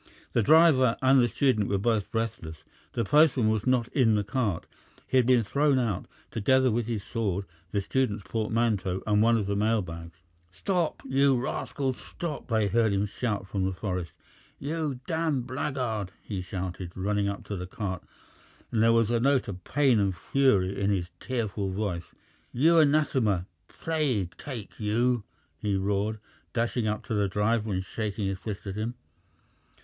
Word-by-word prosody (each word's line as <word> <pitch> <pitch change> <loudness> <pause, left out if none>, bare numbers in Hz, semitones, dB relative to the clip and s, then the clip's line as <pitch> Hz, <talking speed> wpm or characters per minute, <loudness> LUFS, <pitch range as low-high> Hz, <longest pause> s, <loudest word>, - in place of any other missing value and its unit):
The 115 - +3
driver 140 -3 +5
and 130 0 +6
the 120 - +4
student 115 -3 +1
were 100 - +1
both 110 0 0
breathless. 110 -9 -4 0.3
The 115 - 0
postman 140 -2 +4
was 110 +2 0
not 125 -2 +2
in 115 -6 +3
the 105 - +1
cart. 105 -5 -1 0.4
He 130 - +1
had 125 -2 +4
been 125 -3 +5
thrown 140 +5 +2
out, 115 -8 -1 0.2
together 130 +4 +3
with 115 0 -1
his 110 -4 -2
sword, 100 -4 -2 0.2
the 100 +2 0
student's 105 -1 -1
portmanteau, 110 -4 0
and 105 -1 +3
one 115 +1 +4
of 105 - -1
the 100 +1 -1
mail 110 +1 +2
bags. 85 0 -9 0.3
"Stop, 175 - -1
you 135 -1 +3
rascal! 135 +1 -2
Sto 170 +6 -6
op!" - - -17
they 110 -4 +2
heard 110 +2 +2
him 100 +1 +1
shout 105 -1 -3
from 95 -1 -2
the 95 0 0
forest. 90 -3 -3 0.4
"You 145 -3 -3
damned 160 -6 0
blackguard!" 130 -6 -2
he 100 -4 -4
shouted, 90 -1 -5
running 100 +1 0
up 100 - -5
to 105 - -5
the 90 -1 -5
cart, 95 -2 -4 0.7
and 110 - +1
there 115 +1 +5
was 115 -1 +3
a 120 - +2
note 135 +1 +2
of 95 -3 -6
pain 135 -3 +3
and 95 -3 0
fury 100 -4 +2
in 100 - +2
his 95 -3 -1
tearful 110 -6 -2
voice. 95 -3 -3 0.4
"You 165 +6 +4
anathema, 135 - +2 0.2
plague 135 - -1
take 120 -8 -8
you!" 115 +1 +1 0.3
he 105 -3 0
roared, 100 +2 0 0.4
dashing 115 -1 0
up 105 0 -2
to - - -3
the 105 -1 +2
driver 105 +3 0
and 95 -1 -1
shaking 105 0 -3
his 95 0 -2
fist 105 -1 -6
at 100 - -4
him. 110 +4 -3
110 Hz, 175 wpm, -28 LUFS, 100-130 Hz, 0.7 s, and